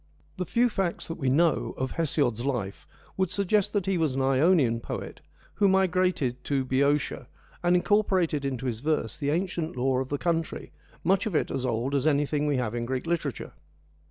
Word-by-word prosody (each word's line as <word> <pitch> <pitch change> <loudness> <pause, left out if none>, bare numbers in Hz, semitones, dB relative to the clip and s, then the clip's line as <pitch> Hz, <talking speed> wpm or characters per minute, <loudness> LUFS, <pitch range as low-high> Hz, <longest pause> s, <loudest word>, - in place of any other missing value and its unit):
The 180 -2 -3
few 240 +1 +3
facts 190 -6 -2
that 165 +1 -6
we 135 -3 +1
know 160 +4 +2
of 130 0 -2
Hesiod's 140 -8 0
life 120 -8 -3 0.3
would 190 -2 +1
suggest 200 +1 +1
that 200 -4 0
he 190 -2 0
was 155 -5 +1
an 135 - 0
Ionian 135 -3 +3
poet - - -6 0.3
who 200 - +3
migrated 185 -9 +1
to 135 -2 0
Bceotia, 135 -1 0 0.3
and 175 0 +3
incorporated 180 -6 +2
into 135 -2 -3
his 115 -4 -2
verse 150 -6 -1
the 145 - -1
ancient 170 -1 -1
lore 130 +1 +1
of 130 - -5
the 145 - -1
country, 165 0 -2 0.3
much 195 +4 +2
of 200 - -3
it - - +1
as 130 -1 -2
old 120 +3 -1
as 140 +1 +1
anything 150 0 +1
we 145 -2 +1
have 120 -3 -1
in 120 0 -3
Greek 130 +2 -2
literature. 160 -7 -3
150 Hz, 185 wpm, -27 LUFS, 130-180 Hz, 0.3 s, few